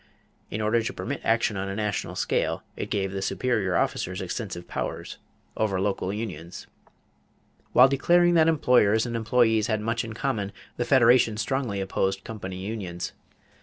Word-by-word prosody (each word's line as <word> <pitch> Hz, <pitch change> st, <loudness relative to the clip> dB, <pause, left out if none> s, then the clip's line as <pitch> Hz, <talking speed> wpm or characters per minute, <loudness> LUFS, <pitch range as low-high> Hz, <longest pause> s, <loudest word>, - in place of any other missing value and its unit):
In 105 Hz, -, -3 dB
order 110 Hz, +2 st, +2 dB
to 115 Hz, -, -3 dB
permit 140 Hz, +3 st, -4 dB
action 115 Hz, -1 st, +2 dB
on 95 Hz, +1 st, -3 dB
a 95 Hz, -, -4 dB
national 105 Hz, -1 st, -2 dB
scale, -, -, 0 dB
it -, -, -5 dB
gave 95 Hz, -2 st, -1 dB
the 95 Hz, 0 st, -4 dB
superior 100 Hz, -3 st, 0 dB
officers 90 Hz, +2 st, -1 dB
extensive 95 Hz, -2 st, -5 dB
powers -, -, -5 dB, 0.4 s
over 100 Hz, -4 st, 0 dB
local 95 Hz, -1 st, -1 dB
unions. 95 Hz, -6 st, -6 dB, 1.1 s
While 125 Hz, -, +8 dB
declaring 175 Hz, +6 st, +3 dB
that 160 Hz, -1 st, +5 dB
employers 125 Hz, -8 st, +4 dB
and 120 Hz, -1 st, -4 dB
employees 110 Hz, -1 st, +2 dB
had 110 Hz, -2 st, 0 dB
much 115 Hz, +2 st, -1 dB
in 115 Hz, -1 st, -6 dB
common, 110 Hz, -5 st, -2 dB, 0.2 s
the 120 Hz, -, -1 dB
Federation 120 Hz, -3 st, +5 dB
strongly 120 Hz, -3 st, -1 dB
opposed 95 Hz, 0 st, -1 dB
company 95 Hz, -4 st, -6 dB
unions. 95 Hz, -3 st, -5 dB
110 Hz, 155 wpm, -26 LUFS, 95-120 Hz, 1.1 s, While